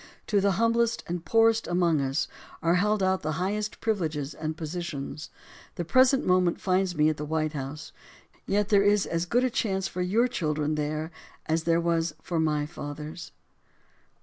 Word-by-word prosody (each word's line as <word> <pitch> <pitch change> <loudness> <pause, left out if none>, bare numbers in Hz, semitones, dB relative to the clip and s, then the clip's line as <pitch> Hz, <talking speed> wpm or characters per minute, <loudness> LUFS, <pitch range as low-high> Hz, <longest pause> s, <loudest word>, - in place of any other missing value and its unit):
To 205 -2 +2
the 200 0 +3
humblest 230 +3 +1
and 175 -1 -4
poorest 225 +5 +3
amongst 175 -4 +2
us 135 +3 -1 0.4
are 170 0 +3
held 205 +2 +2
out 190 0 +2
the 155 +1 -2
highest 205 +5 -2
privileges 155 -9 -1
and 155 +1 -4
positions. 155 -3 -5 0.5
The 175 - -3
present 260 - +4
moment 180 -1 +2
finds 185 -1 +1
me 150 0 +3
at 155 - -2
the 150 - -4
White 155 0 -1
House, 145 +1 -6 0.6
yet 205 +1 +1
there 200 -2 +5
is 205 0 +3
as 165 +1 -2
good 245 +6 +2
a 255 - +1
chance 195 -6 -1
for 180 - -4
your 215 +7 +2
children 155 -9 -1
there 155 +2 -2 0.3
as 160 0 0
there 165 0 +3
was 165 -2 0
for 170 -2 -3
my 150 -2 +1
father's. 150 +2 -7
170 Hz, 175 wpm, -27 LUFS, 155-200 Hz, 0.6 s, there